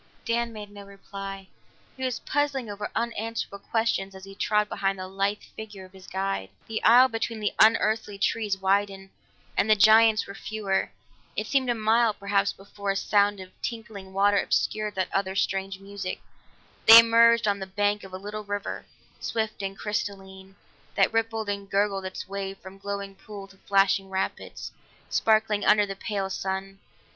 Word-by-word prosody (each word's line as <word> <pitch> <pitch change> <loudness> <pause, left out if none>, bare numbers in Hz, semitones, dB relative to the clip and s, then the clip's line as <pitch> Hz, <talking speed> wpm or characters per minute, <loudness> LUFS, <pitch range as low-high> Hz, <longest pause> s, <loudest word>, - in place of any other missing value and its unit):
Dan 235 0 0
made 210 -2 -9
no 205 0 -10
reply; 195 -1 -8 0.5
he 260 - -7
was 255 -2 -2
puzzling 275 -6 -1
over 205 0 -5
unanswerable 230 -3 -3
questions 200 -2 -1
as 190 - -11
he 195 0 -10
trod 210 +1 +1
behind 195 -1 -1
the 185 0 -6
lithe 195 +2 -1
figure 210 -3 -9
of 185 - -18
his 190 -1 -14
guide. 190 - -2 0.2
The 220 0 -4
aisle 245 +3 +7
between 225 -1 -3
the 210 - -1
unearthly 220 -2 +3
trees 205 -1 0
widened, 195 0 0 0.4
and 220 - +1
the 215 - +7
giants 220 +1 +6
were 200 - -9
fewer. 205 -2 -2 0.5
It - - -2
seemed 265 -3 +1
a 240 - +2
mile, 220 0 +3
perhaps, 200 0 +1
before 200 +1 -7
a 195 - +1
sound 205 0 +2
of 185 -1 -10
tinkling 220 -5 -6
water 200 +1 +3
obscured 215 -1 -1
that 185 -1 -2
other 190 -1 0
strange 195 -1 -1
music; 195 -1 -6 0.7
they 225 - +13
emerged 230 0 +6
on 200 -1 +1
the 190 - -5
bank 205 +2 0
of 195 - -11
a 185 - -5
little 210 +2 -6
river, 205 0 -5 0.3
swift 220 -2 -3
and 195 0 -4
crystalline, 195 -2 -5 0.4
that - - +3
rippled 225 -1 -1
and 200 -1 -4
gurgled 200 -1 0
its 185 - -6
way 195 0 -4
from 190 +1 -13
glowing 200 0 -5
pool 200 0 -10
to 195 - -19
flashing 195 0 +2
rapids, 190 0 -4 0.4
sparkling 215 -2 +2
under 210 0 +5
the 195 -1 -6
pale 195 -1 -3
sun. 190 0 -4
200 Hz, 170 wpm, -26 LUFS, 195-220 Hz, 0.7 s, they